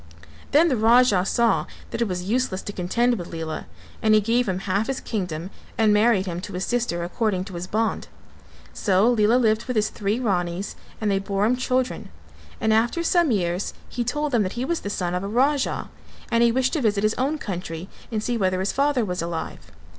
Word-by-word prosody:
Then 315 +4 +5
the 275 - +2
Raja 225 -3 +5
saw 235 +3 +2 0.2
that - - -3
it 235 - +2
was 180 -2 -3
useless 215 -1 -1
to 205 - -6
contend 235 +6 +1
with 175 - -7
Lela, 160 -1 -5 0.3
and 215 0 +4
he - - +6
gave 230 +2 +1
him 185 - 0
half 200 +3 0
his 270 -1 -2
kingdom 180 -4 -4 0.3
and 220 -2 +4
married 210 -2 +3
him 175 -1 -4
to 205 +1 -8
his 180 +1 -2
sister 235 -8 -1
according 185 +1 -1
to 190 0 -10
his 175 +1 -5
bond. 220 +3 -1 0.7
So 200 +3 +3
Lela 220 0 +3
lived 220 -2 +2
with 250 - -3
his 215 0 +2
three 210 +2 -1
Ranis 180 -4 -1 0.3
and 210 -2 0
they 195 - +2
bore 195 +1 0
him 240 +3 +3
children 255 0 -1 0.5
and 220 0 +2
after 240 +10 +2
some 340 -2 +3
years 180 -4 -1
he 245 - -2
told 295 +5 -1
them 240 -4 +3
that 185 -1 -1
he 245 +2 -2
was 335 +3 -1
the 200 - -5
son 180 -3 -2
of 180 - -1
a - - -3
Raja 270 +6 +1 0.4
and 230 - +3
he 235 0 +5
wished 260 +1 +1
to 315 - 0
visit 210 -3 +1
his 215 +1 +3
own 280 +4 +1
country 180 - -5 0.2
and 215 -2 -2
see 240 0 0
whether 185 -2 +1
his 190 +1 0
father 275 -4 +1
was 180 -2 -3
alive. 160 - -5
215 Hz, 215 wpm, -24 LUFS, 185-245 Hz, 0.7 s, he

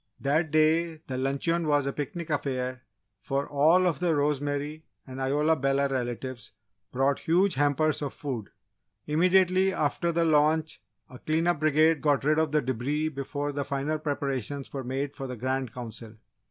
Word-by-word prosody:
That 155 +4 +1
day 160 +1 +2
the 130 - -5
luncheon 140 +6 0
was 145 -2 +2
a 140 - -2
picnic 160 +3 -5
affair, 130 -3 -2 0.4
for 140 +1 -2
all 160 +6 +4
of 175 -3 0
the 170 -2 +1
Rosemary 145 +1 -1 0.2
and 130 0 -7
Isola 150 +4 +2
Bella 135 0 +1
relatives 125 -3 -4 0.4
brought 135 +2 +1
huge 180 +3 +2
hampers 145 +2 +1
of 145 -2 -3
food. 125 -8 -5 0.6
Immediately 185 +4 +3
after 170 +1 0
the 170 0 +1
lunch 155 0 +2 0.3
a 125 - -12
cleanup 165 +1 +1
brigade 155 0 +3
got 145 -3 +2
rid 155 +2 +3
of 160 -2 +1
the 150 -1 +2
debris 135 +5 -1
before 145 0 -4
the 140 0 -2
final 140 +2 -2
preparations 140 -2 -3
were 135 -2 -4
made 135 +3 -3
for 135 - -5
the 125 -1 -6
Grand 130 0 -2
Council. 115 -2 -9
145 Hz, 160 wpm, -27 LUFS, 135-155 Hz, 0.6 s, all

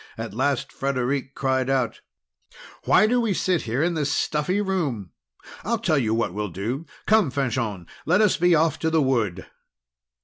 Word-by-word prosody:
At 115 -3 -6
last 135 +2 -1
Frederic 135 0 -2
cried 130 -1 0
out: 130 -3 0 0.8
"Why - - +5
do 245 +3 +2
we 215 -5 0
sit 180 -2 +1
here 125 +7 0
in 175 +1 +1
this 150 -3 -1
stuffy 150 +7 0
room? 150 - -2 0.5
I'll 235 +2 0
tell 170 -10 +1
you 110 -3 0
what 115 -6 -1
we'll 105 0 -3
do! 115 - -4 0.2
Come, 215 -7 +4
Fanchon, 120 -9 -2 0.2
let 180 +5 +4
us 210 -3 +4
be 175 0 +3
off 160 +1 +2
to 160 - 0
the 160 0 +2
wood!" 105 -10 0
140 Hz, 170 wpm, -24 LUFS, 115-175 Hz, 0.8 s, Why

